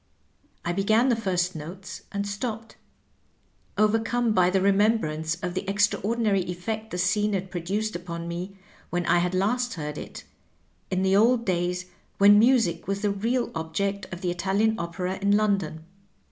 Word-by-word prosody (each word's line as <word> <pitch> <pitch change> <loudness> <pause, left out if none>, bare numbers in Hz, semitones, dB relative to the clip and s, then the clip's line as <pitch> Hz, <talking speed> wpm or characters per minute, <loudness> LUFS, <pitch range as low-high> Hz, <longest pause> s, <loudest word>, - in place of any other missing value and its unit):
I 175 - 0
began 215 +7 +3
the 240 - +3
first 185 -4 -1
notes 175 +6 -8
and 200 0 -2
stopped, 225 +2 -5 1.0
overcome 225 +2 +2
by 180 -3 +4
the 190 +1 +2
remembrance 195 -6 +2
of 180 -1 -2
the 185 - -1
extraordinaiy 205 0 +1
effect 215 +5 -4
the 180 - -4
scene 205 +4 +1
had 190 -1 -3
produced 195 +5 -2
upon 170 -1 -5
me 180 +3 -5 0.3
when 175 0 -1
I 175 - +4
had 180 +1 0
last 240 +5 0
heard 150 -2 -5
it, - - -9 0.7
in 185 0 0
the 190 0 +3
old 235 +3 +4
days 180 0 -1 0.3
when 205 +1 +7
music 230 -8 +3
was 195 0 -2
the 205 -1 +1
real 230 +5 -1
object 195 +5 -3
of 175 -1 -7
the 180 -2 0
Italian 200 +5 +1
opera 180 +2 -3
in 200 +1 +4
London. 195 -7 0
195 Hz, 160 wpm, -26 LUFS, 180-215 Hz, 1.0 s, when